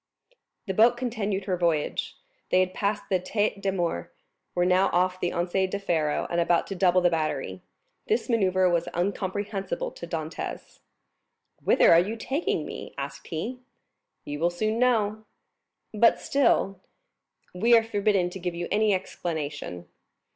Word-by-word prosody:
0111m - - -41 0.3
The 190 - -2
boat 230 +4 +5
continued 215 -6 -2
her 185 -2 -1
voyage. 165 -4 -1 0.3
They 185 - +4
had 185 0 -1
passed 205 +1 -1
the 185 - +1
Tête 205 +2 -1
de 195 -1 0
Mort, 170 - -2 0.4
were 175 0 +2
now 185 +2 +4
off 185 +1 +1
the 175 - -1
Anse 175 +1 -2 0.2
du 200 - -2
Pharo, 160 -6 0
and 170 0 +2
about 170 0 +2
to 195 - -5
double 185 -1 +3
the 175 -1 +3
battery. 145 - -2 0.5
This 440 - +1
manœuvre 185 -6 +2
was 170 - +1
incomprehensible 195 +1 -2
to 170 - -9
Dantès. 160 -1 -5 0.8
"Whither - - +5
are 165 - +7
you 205 +6 -1
taking 270 +8 -2
me?" - - -8
asked - - -6
he. 220 +10 -4 0.7
"You 145 0 -5
will 170 +2 +3
soon 215 +6 -1
know." 220 -4 +1 0.7
"But 230 +2 +4
still——" 230 -8 +2 0.7
"We 230 +6 +5
are 225 - +3
forbidden 205 -4 +1
to 190 - -7
give 175 -1 -3
you 175 0 -3
any 210 -1 +3
explanation." 150 - -5
185 Hz, 155 wpm, -26 LUFS, 175-210 Hz, 0.8 s, are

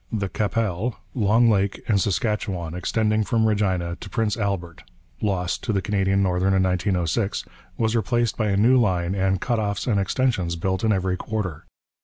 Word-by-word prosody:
The 100 -4 -2
Qu'Appelle, 110 +1 -1 0.2
Long 115 +1 +3
Lake 100 -3 +1
and 100 -4 +3
Saskatchewan, 95 -4 -1
extending 110 +4 0
from 110 +1 +1
Regina 95 -5 0
to 100 - -9
Prince 105 +2 0
Albert, 95 -6 -3 0.4
lost 95 -3 -1
to 120 - 0
the 100 - +2
Canadian 100 -1 +1
Northern 95 +1 +1
in 95 - +3
1906, 95 +2 0 0.3
was 110 0 +1
replaced 120 0 +1
by 110 - 0
a 100 - +1
new 125 +5 +5
line 90 -5 +1
and 95 -1 +1
'cutoffs' 105 -4 -1
and 105 -5 +2
extensions 95 -4 0
built 95 +3 -2
in 110 - +3
every 95 -2 0
quarter. 90 -8 -4
100 Hz, 165 wpm, -23 LUFS, 90-110 Hz, 0.4 s, new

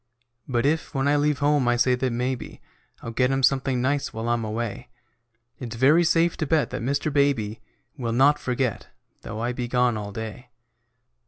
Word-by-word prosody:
But 120 -1 0
if, 155 0 0
when 135 +1 +1
I 145 - +3
leave 145 0 +2
home, 145 -2 +2
I 120 - +3
say 125 +1 +3
that 125 0 0
maybe 125 +1 -3 0.4
I'll 115 - -5
get 125 +2 +1
him 135 0 0
something 130 -1 +2
nice 140 +2 0
while 115 +1 -4
I'm 120 -1 0
away, 110 0 -4 0.7
It's 120 -3 -6
very 145 +8 +5
safe 170 0 +2
to 155 - -2
bet 155 0 +1
that - - -4
Mr. 140 +4 -1
Baby 120 -7 +1 0.4
Will 120 -4 -3
not 135 +5 +4
forget, 125 -2 -2 0.3
though 110 - -7
I 120 +2 -1
be 125 -1 -4
gone 125 -2 +1
all 105 -1 -5
day. 110 +4 -7
125 Hz, 185 wpm, -24 LUFS, 120-140 Hz, 0.7 s, very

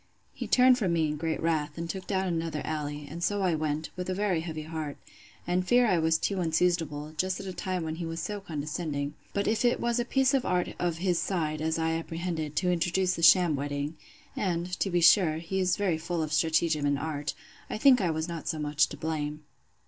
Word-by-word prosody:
He - - -5
turned 255 0 +5
from 190 -6 +1
me 160 -2 +2
in 150 - -2
great 160 +1 -2
wrath, 155 -2 0
and 170 0 -3
took 190 +2 -6
down 190 -1 0
another 165 -3 -2
alley, 150 -1 -4
and 170 +3 -6
so 205 +1 +1
I 180 -2 +2
went, 155 0 -2
with 180 0 -4
a 185 - -1
very 195 -4 +1
heavy 160 -2 -5
heart; 155 -2 -5 0.5
and 180 +1 0
fear 245 +3 +5
I 185 -6 +3
was 160 0 +3
too 195 +2 -1
unseasonable, 160 -3 0
just 185 0 0
at 200 - -7
a 190 - -5
time 185 -1 -3
when 160 0 -4
he 170 - -4
was 165 0 -4
so 205 +4 -3
condescending: 150 -3 -3 0.2
but 200 - -1
if 220 +2 +1
it 240 0 +3
was 235 0 0
a - - +2
piece 265 +2 +2
of 270 -2 +2
art 180 -1 0
of 175 -2 0
his 175 -1 +1
side, 155 -5 -1
as 160 +1 0
I 160 0 0
apprehended, 165 -2 -3
to 180 -1 +2
introduce 180 +2 +1
the 170 - -4
sham 175 -2 +6
wedding, 145 +2 -3 0.4
(and, 175 -3 -1
to 195 - +1
be 175 -1 +1
sure, 165 -1 +6
he 170 +4 -3
is 185 -1 +2
very 185 -6 0
full 170 0 -2
of 155 0 -4
stratagem 160 0 +2
and 145 0 +2
art,) 150 0 -3 0.3
I - - -3
think 255 0 +6
I 180 - +1
was 160 0 -2
not 170 -2 -6
so 160 - -1
much 150 0 +2
to - - -9
blame. 150 -1 -3
165 Hz, 230 wpm, -28 LUFS, 155-185 Hz, 0.5 s, sham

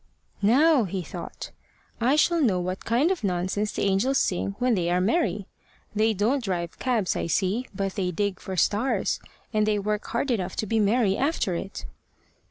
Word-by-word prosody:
"Now," 265 +5 +4
he 185 0 -3
thought, - - -8 0.5
"I 250 +5 +3
shall 335 +2 +3
know 205 -10 +2
what 185 +1 -4
kind 255 +10 +2
of 365 -11 -2
nonsense 190 +3 -1
the - - -2
angels 200 +8 +2
sing 195 -1 0
when 250 -1 +2
they 175 -4 0
are 180 +1 +2
merry. 205 - +1 0.5
They 215 +1 +2
don't 235 +7 +1
drive 175 -4 -3
cabs, 235 -7 0
I - - -2
see, 200 +8 0
but 195 -1 -3
they 185 -2 -1
dig 200 +2 -2
for 190 -1 -6
stars, 215 +9 +1 0.3
and 215 0 +2
they 210 -1 +2
work 210 +1 -2
hard 270 +1 -1
enough 190 -6 -1
to - - -1
be 225 +2 0
merry 210 -1 +3
after 275 - 0
it." 195 +4 -5
210 Hz, 180 wpm, -26 LUFS, 190-245 Hz, 0.5 s, Now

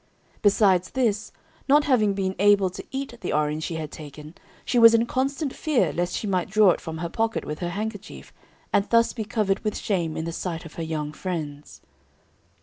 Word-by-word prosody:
Besides 195 -3 +3
this, 220 -5 -1 0.4
not 295 +2 +6
having 215 -8 +2
been 190 -1 -1
able 200 -2 +4
to - - -8
eat 270 -1 -5
the 180 - -3
orange 150 +1 0
she 165 - -4
had 155 -2 -5
taken, 150 +1 -10 0.3
she 245 - +2
was 230 0 +8
in 230 +1 +3
constant 275 +3 -1
fear 255 - +1
lest 175 +1 -1
she - - -3
might 185 -3 -1
draw 210 -1 +5
it - - -3
from 160 -1 -6
her 170 +1 -3
pocket 225 +4 -1
with 150 0 -5
her 175 - -2
handkerchief, 205 +2 -6 0.4
and 200 - +2
thus 230 0 +3
be 225 - -4
covered 205 -2 0
with 215 -1 -3
shame 170 -6 -1
in 160 - -3
the 170 - -3
sight 165 0 -4
of 165 - -11
her 165 - -5
young 155 -2 -3
friends. 155 -5 -6
195 Hz, 200 wpm, -25 LUFS, 165-225 Hz, 0.4 s, was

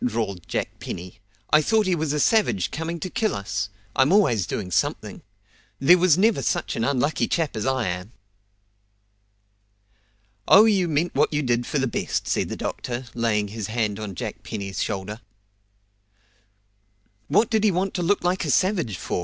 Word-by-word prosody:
drawled 105 -7 -2
Jack - - -3
Penny. 90 +1 -7 0.3
"I 155 - +7
thought 220 +7 +2
he 185 - +1
was 160 -3 -1
a 150 - -1
savage 205 - +2
coming 165 +2 -4
to - - -2
kill 220 +2 -1
us. 100 0 -3 0.3
I'm 135 +4 +4
always 120 - +3
doing 90 -3 -4
something. - - -1 0.6
There 145 +7 +6
never 185 +5 +4
was 130 - -2
such - - -1
an 115 - -1
unlucky 140 +4 +1
chap 160 -7 -1
as 110 +3 -2
I 130 -4 0
am!" 90 +4 -4 2.4
"Oh, 205 +3 +8
you 195 -5 +3
meant 160 +2 0
what - - +2
you 150 0 0
did 120 -1 0
for - - -1
the 135 - +1
best!" 120 - -2
said - - 0
the - - -4
doctor, 125 +1 -4
laying 105 -3 0
his 105 -1 -5
hand 110 -2 -1
on 105 -3 -6
Jack - - -5
Penny's 100 -3 -5
shoulder. 105 +2 -4 2.1
"What 205 +10 +2
did 220 -2 +2
he 215 - +5
want 190 +1 -1
to 180 - -2
look 185 +3 +1
like 180 +2 0
a - - -3
savage 175 - +1
for?" - - -3
135 Hz, 175 wpm, -24 LUFS, 105-180 Hz, 2.4 s, Oh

